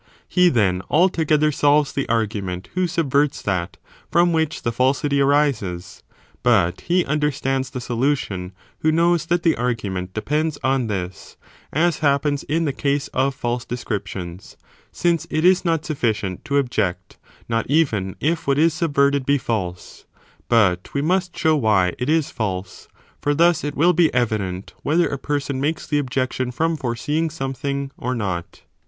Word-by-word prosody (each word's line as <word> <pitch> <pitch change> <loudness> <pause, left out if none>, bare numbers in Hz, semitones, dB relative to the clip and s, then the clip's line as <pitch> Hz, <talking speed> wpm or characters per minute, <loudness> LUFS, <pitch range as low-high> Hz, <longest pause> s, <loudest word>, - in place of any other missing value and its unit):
He 180 -1 +4
then, 95 - +2
alto 175 0 +3
gether 155 0 +3
solves 145 0 +3
(the 135 - -2
argument) 105 -5 -2
who 185 0 +1
subverts 150 -4 0
that, 90 -2 -2 0.3
from 170 0 +3
which 160 -1 -1
the 120 - 0
falsity 140 +3 +1
arises, 135 -11 0 0.4
but 95 -8 +2
he 175 +1 +1
understands 135 -3 -1
the 130 - -5
solution 120 -7 -1 0.3
who 155 - +2
knows 170 +1 +2
that 175 0 +1
the 165 -2 +3
argument 100 -7 -3
depends 150 +6 -1
on 130 -2 +1
this, 95 -4 -5 0.3
as 170 +3 +1
(happens) 145 -1 +1
in 165 +3 -1
the 140 - -1
case 140 +1 -1
of 135 +1 0
false 120 0 -2
descriptions, 100 -6 -6 0.3
since 170 -2 0
it 155 +2 0
is 185 0 +5
not 165 -3 0
sufficient 110 - -2
to 140 - 0
object, 95 -9 -1 0.3
not 115 0 -1
even 115 - +1
if 160 +1 -1
what 140 0 +2
is 160 +1 +4
subverted 140 -4 +2
be 140 +2 +2
false, 95 -9 -4 0.4
but 95 -7 +2
we 140 - +1
must 180 +2 0
show 160 0 +3
why 105 -9 +2
it 125 +3 -2
is 160 -2 +1
false, 95 -4 -4 0.3
for 145 0 +1
thus 170 +2 +3
it 145 0 -3
will 170 +5 +4
be 165 -1 +3
evident 100 -6 -1
whether 165 +4 +2
a 140 - -4
person 140 -2 -2
makes 155 +3 -1
the 145 -1 0
objection 130 -2 -1
from 160 +6 0
foreseeing 145 +5 -1
something 140 -1 -3
or 125 +1 -2
not. 95 -7 -4
140 Hz, 160 wpm, -21 LUFS, 110-155 Hz, 0.4 s, is